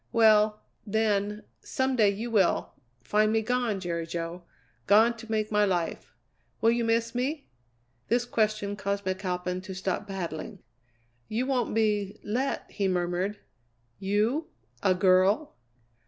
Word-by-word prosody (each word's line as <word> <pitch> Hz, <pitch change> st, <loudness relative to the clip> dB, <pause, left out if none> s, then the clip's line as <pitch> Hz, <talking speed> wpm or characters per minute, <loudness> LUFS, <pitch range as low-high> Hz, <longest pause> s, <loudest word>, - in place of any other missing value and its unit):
Well, 215 Hz, -2 st, +4 dB, 0.2 s
then, 210 Hz, -1 st, 0 dB, 0.2 s
some 260 Hz, 0 st, -1 dB
day 215 Hz, -4 st, +5 dB
you 220 Hz, +4 st, -3 dB
will 200 Hz, -5 st, +2 dB, 0.3 s
find 215 Hz, -, +2 dB
me 220 Hz, 0 st, +1 dB
gone, 245 Hz, -3 st, 0 dB
Jerry 170 Hz, -2 st, -3 dB
Jo. 170 Hz, +1 st, -4 dB, 0.5 s
Gone 220 Hz, +4 st, +5 dB
to 225 Hz, 0 st, -11 dB
make 215 Hz, -1 st, 0 dB
my 210 Hz, 0 st, +3 dB
life. 180 Hz, -4 st, -2 dB, 0.4 s
Will 225 Hz, -, +4 dB
you 235 Hz, 0 st, +1 dB
miss 230 Hz, 0 st, +1 dB
me?" 275 Hz, +5 st, -2 dB, 0.6 s
This 240 Hz, +1 st, +1 dB
question 215 Hz, -3 st, 0 dB
caused 200 Hz, 0 st, -2 dB
McAlpin 185 Hz, -1 st, -2 dB
to 190 Hz, 0 st, -8 dB
stop 190 Hz, +2 st, -2 dB
paddling. 190 Hz, -1 st, -5 dB, 0.7 s
"You 235 Hz, +4 st, -1 dB
won't 255 Hz, -5 st, 0 dB
be 210 Hz, -2 st, 0 dB
let!" 250 Hz, +6 st, -1 dB
he 200 Hz, -2 st, 0 dB
murmured; 180 Hz, +2 st, -1 dB, 0.6 s
"you 215 Hz, +11 st, 0 dB, 0.3 s
a 190 Hz, -2 st, +3 dB
girl!" 190 Hz, +9 st, +3 dB
210 Hz, 135 wpm, -28 LUFS, 190-225 Hz, 0.7 s, day